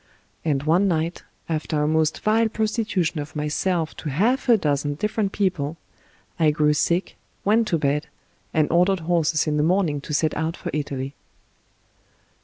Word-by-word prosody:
And 145 -4 0
one 170 +6 +3
night, 165 -1 -1 0.3
after 155 -2 -1
a - - +1
most 155 0 +1
vile 220 +1 +3
prostitution 215 -7 -1
of 145 +2 -7
myself 160 +2 -1
to 150 - -5
half 235 - +1
a 235 - +7
dozen 145 -4 0
different 210 +3 -1
people, 170 -7 -1 0.6
I 160 -2 +5
grew 150 0 +2
sick, 170 +4 0 0.3
went 220 +2 +3
to 170 - +1
bed, 150 0 0 0.4
and 155 -1 +2
ordered 180 +2 +3
horses 160 -2 +1
in 150 -1 0
the - - +2
morning 165 -3 +1
to - - -8
set 155 +1 +1
out 160 +2 -2
for - - -5
Italy. 140 -2 -3
160 Hz, 160 wpm, -23 LUFS, 150-190 Hz, 0.6 s, a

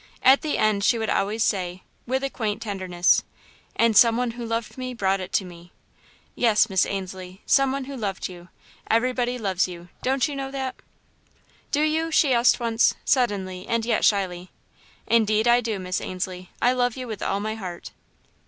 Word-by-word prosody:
At 265 +2 +6
the 305 - -1
end 215 -2 +2
she 235 +3 +3
would 220 -1 -1
always 215 +3 0
say, 185 -2 -1 0.2
with 260 +2 -1
a 275 - 0
quiet 215 -4 -2
tenderness: 185 -4 +1 0.5
"and 230 -1 +3
some 230 0 +6
one 245 -1 0
who 240 +1 -7
loved 230 -1 -3
me 255 -1 -5
brought 195 -3 +1
it 185 -1 -7
to 195 - +1
me!" 175 0 -13 0.6
"Yes, 220 -2 +3
Miss 190 -1 +3
Ainslie; 190 -1 -6
some 275 -1 +3
one 275 0 -3
who 275 +1 -7
loved 200 -6 -3
you. 175 -1 -12 0.4
Everybody 245 +1 +1
loves 190 -6 0
you; 175 -1 -10
don't 265 +2 +1
you 290 - -5
know 270 -1 -4
that?" 265 -1 -4 1.0
"Do 295 +1 +1
you?" 320 +1 +1
she 295 -4 +3
asked 240 +2 +4
once, 230 -1 +2
suddenly 195 -8 0
and 230 -1 0
yet 235 - +1
shyly. 185 -3 +1 0.6
"Indeed 220 0 +2
I 240 +1 +5
do, 225 -3 -2
Miss 185 -1 -3
Ainslie 185 0 -5
I 245 - +4
love 245 -1 0
you 255 -1 -5
with 215 -3 -6
all 200 - -1
my 215 +1 -3
heart." 185 -5 -7
220 Hz, 185 wpm, -24 LUFS, 190-250 Hz, 1.0 s, At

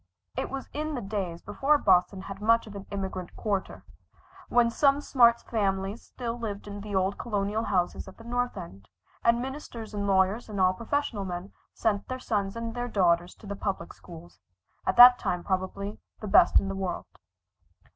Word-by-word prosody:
It - - -2
was 275 0 -5
in 305 0 -3
the 245 - -3
days 195 -4 -4
before 295 +2 +2
Boston 185 -5 +3
had 195 0 -8
much 230 +2 +3
of 210 -2 -11
an 200 0 -8
immigrant 190 -3 -5
quarter, 200 -3 -3 0.6
when 240 -1 +4
some 275 +3 +3
smart 235 -5 +4
families 195 -1 -1
still 240 -1 -6
lived 210 -3 -5
in 205 0 -7
the 205 -1 -5
old 190 +1 0
Colonial 210 0 -1
houses 180 -2 -1
at 190 - -12
the 230 - -13
North 245 0 -2
End, 100 - -10 0.3
and 235 0 +4
ministers 245 -4 -6
and 200 -1 -2
lawyers 195 +4 +2
and 205 -2 -4
all 185 0 +4
professional 235 0 -2
men 180 +1 -5 0.2
sent 205 -3 0
their 255 - -3
sons 205 -5 -2
and 230 0 -4
their 245 0 -3
daughters 175 -5 +2
to - - -16
the 200 0 -5
public 195 -4 -4
schools, 175 -1 -13 0.5
at - - +2
that 245 0 +10
time 180 -1 -2
probably 195 +2 -3 0.2
the 215 - -6
best 195 - +6
in 195 - -3
the 195 - -2
world. 190 -2 -3
205 Hz, 185 wpm, -28 LUFS, 190-235 Hz, 0.6 s, that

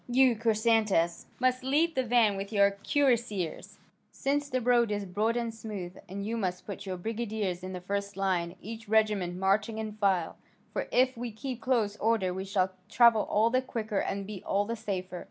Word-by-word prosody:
You, 250 0 +4
Chrysantas, 215 -6 +2
must 255 0 +1
lead 305 +6 +2
the 260 - +1
van 230 -4 +3
with 195 +1 -5
your 200 -2 +4
cuirassiers, 230 - 0 0.3
since 285 +1 -1
the 255 - 0
road 240 -1 +3
is 205 -1 -2
broad 215 +5 0
and 235 -1 -2
smooth, 205 -5 -7
and 200 +2 -5
you 230 +2 -2
must 180 -4 -2
put 200 -1 -7
your 185 -1 -3
brigadiers 215 -3 -3
in 185 0 -5
the 180 - -5
first 200 +1 -3
line, 185 -3 0
each 225 0 -8
regiment 210 -5 +2
marching 200 +4 +1
in 220 -1 -3
file, 195 -5 0 0.4
for - - -2
if 255 +1 +3
we 235 0 -5
keep 245 +2 -6
close 225 -4 +1
order 210 -5 +1
we 190 +1 -4
shall 190 -1 +1 0.2
travel 230 -3 +5
all 220 +3 +3
the 255 +1 +3
quicker 220 -5 -3
and 200 0 -2
be 205 -2 -7
all 200 +1 +1
the 230 +2 -3
safer. 185 -4 -4
215 Hz, 190 wpm, -29 LUFS, 195-235 Hz, 0.4 s, travel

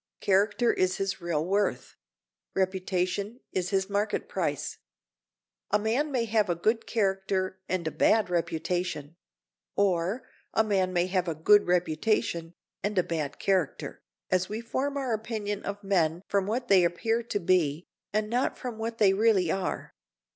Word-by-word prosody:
Character 205 +5 +3
is 185 0 +1
his 195 -1 -2
real 165 -3 -1
worth; 190 -8 0 0.6
reputation 190 +3 -1
is 185 -1 -1
his 190 -1 +1
market 205 +1 -1
price. - - -2 0.9
A - - +4
man 230 +8 0
may 245 -4 +1
have 215 -3 +1
a 175 - +2
good 220 +7 0
character 190 -3 0
and 185 -3 -1
a 160 - -1
bad 220 +6 +3
reputation; 170 -2 -2 0.6
or, 195 +3 +1 0.3
a 220 - +5
man 195 -4 +1
may 175 -1 +2
have 185 -1 0
a 165 - -1
good 205 +6 +5
reputation 170 -1 0 0.3
and 205 0 -2
a 180 - +5
bad 155 -4 -3
character, 185 -6 -1 0.3
as 185 0 +2
we 215 +2 -3
form 265 +5 -2
our 260 -4 -1
opinion 215 -2 -3
of 200 +1 -5
men 175 -3 +1
from 200 -1 +1
what 245 +4 -1
they 190 -3 +6
appear 225 +7 +1
to 230 -3 -2
be, 170 -3 +1 0.3
and 215 0 0
not 245 +4 0
from 240 -3 -6
what 225 +1 -3
they 200 -4 +5
really 195 -5 +3
are. 190 -1 -3
195 Hz, 155 wpm, -28 LUFS, 180-215 Hz, 0.9 s, they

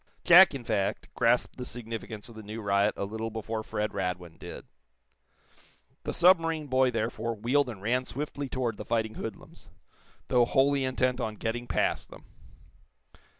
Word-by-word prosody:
Jack, 175 -2 +8
in 130 - -6
fact, 105 -4 -2
grasped - - +2
the 125 - -5
significance 115 -3 -6
of 115 - -12
the 110 - -9
new 110 +2 -7
riot 100 0 +2
a - - -2
little 110 +2 -4
before 110 0 -4
Fred 105 0 -3
Radwin 90 -3 -4
did. - - -9 1.4
The - - -1
submarine 165 -3 +4
boy, 130 -1 +3
therefore, 115 0 -2
wheeled 125 +6 +1
and 100 -5 -8
ran 125 +4 +1
swiftly 140 0 -5
toward 125 -4 -2
the - - -6
fighting 110 -1 -1
hoodlums, 110 -2 -8 0.6
though 120 -1 +4
wholly 135 +2 +2
intent 130 0 0
on 110 -2 -3
getting 120 +3 -3
past - - 0
them. - - -14
115 Hz, 155 wpm, -29 LUFS, 110-130 Hz, 1.4 s, Jack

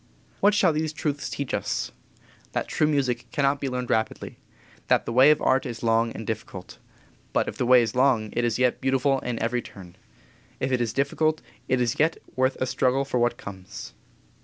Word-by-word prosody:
What 205 0 +4
shall 185 -5 +4
these 155 0 -1
truths 145 -2 -3
teach 140 -2 -4
us? - - -2 0.6
That - - -1
true 155 - +1
music 130 -5 0
cannot 140 0 +1
be 135 - -1
learned 125 -1 -3
rapidly; 110 0 -2 0.5
that - - +3
the 115 - -3
way 130 +4 +7
of 150 - +4
Art 130 0 +3
is 120 -3 -6
long 115 0 +2
and 110 - -7
difficult. 105 -4 -6 0.5
But - - +1
if - - -4
the 125 - 0
way 125 -1 +7
is 110 - -3
long, 125 -5 +2
it 120 - -1
is 120 -1 +1
yet 125 -1 +1
beautiful 135 +1 +2
in 120 -2 -4
every 120 +2 -1
turn; 90 -5 -13 0.6
if 130 - -1
it 125 -1 +1
is 115 -3 0
difficult, 155 +4 0 0.2
it 130 -1 +1
is 120 -2 0
yet 160 +2 +2 0.2
worth 130 +1 +1
a - - +1
struggle 130 +2 +1
for 125 -2 -1
what 120 0 +1
comes. 95 -11 -9
125 Hz, 200 wpm, -25 LUFS, 115-140 Hz, 0.6 s, way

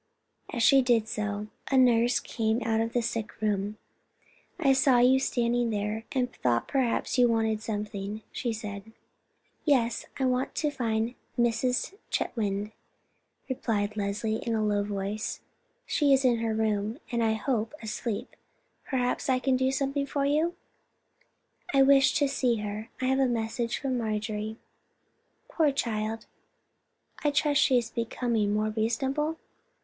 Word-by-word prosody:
As 235 - -1
she 270 +3 +7
did 235 -3 +2
so, 210 -2 -3 0.2
a 270 - +3
nurse 245 -1 +4
came 225 +1 -1
out 225 -1 +1
of 230 0 -1
the 240 - +1
sick 225 -2 -4
room. 210 0 -1 0.8
"I 275 -5 +4
saw 265 -1 +4
you 255 +2 +5
standing 240 -2 +1
there, 210 +1 -2
and 255 -3 -1
thought 120 -2 0
perhaps 260 -1 0
you 245 - +6
wanted 220 -2 +1
something," 210 -1 -4
she 240 - -2
said. 210 -1 -7 0.7
"Yes, 245 -6 +1
I 265 - 0
want 255 +1 0
to 300 -2 0
find 230 -3 -1 0.2
Mrs. 240 +6 +1 0.2
Chetwynd," 205 -2 -1 0.8
replied 215 -5 -1
Leslie, 210 +2 -1
in 230 0 -2
a 215 - +1
low 205 -1 +1
voice. 205 +1 -3 0.4
"She 290 -3 +3
is 270 0 +3
in 240 -2 +3
her 225 -1 -1
room, 215 +1 0
and, 235 -1 +1
I 220 -1 +3
hope, 225 0 -1
asleep. 220 0 -4 0.5
Perhaps 250 0 -1
I 260 - +4
can 260 +1 +1
do 260 +1 +2
something 275 +1 -1
for 280 0 -1
you?" 310 +5 +1 1.2
"I 270 - +7
wished 270 0 +5
to 290 -3 +3
see 260 -3 +1
her. 210 +2 -5
I 255 - -1
have 265 +1 +2
a 265 - +4
message 230 0 -1
from 260 -3 -1
Marjorie." 215 0 -3 0.9
"Poor 310 -3 +2
child, 225 -4 -2 1.0
I 295 - +4
trust 290 0 +2
she 260 - +4
is 235 -2 -1
becoming 230 -2 -1
more 215 +1 0
reasonable. 265 +8 -1
230 Hz, 150 wpm, -28 LUFS, 215-260 Hz, 1.2 s, she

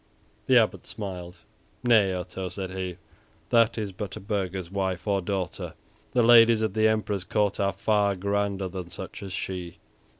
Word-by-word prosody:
The - - +6
Abbot - - +2
smiled. 90 -4 -7 0.4
"Nay, 110 -6 +5
Otto," 90 +1 -4
said 95 +1 -5
he, 95 -1 -4 0.5
"that 115 -1 +4
is 105 -3 -2
but 95 +1 -6
a - - -6
burgher's 95 -3 -3
wife 95 -2 -2
or 100 -2 +1
daughter; 95 -1 -3 0.4
the 125 - +4
ladies 115 -1 +7
at 110 -3 0
the 110 0 +4
Emperor's 105 -3 0
court 100 +2 0
are 100 -1 +2
far 100 0 +2
grander 100 0 -1
than 90 -1 -6
such 95 +3 -8
as 100 -1 -7
she." 90 -2 -5
100 Hz, 165 wpm, -27 LUFS, 95-105 Hz, 0.5 s, ladies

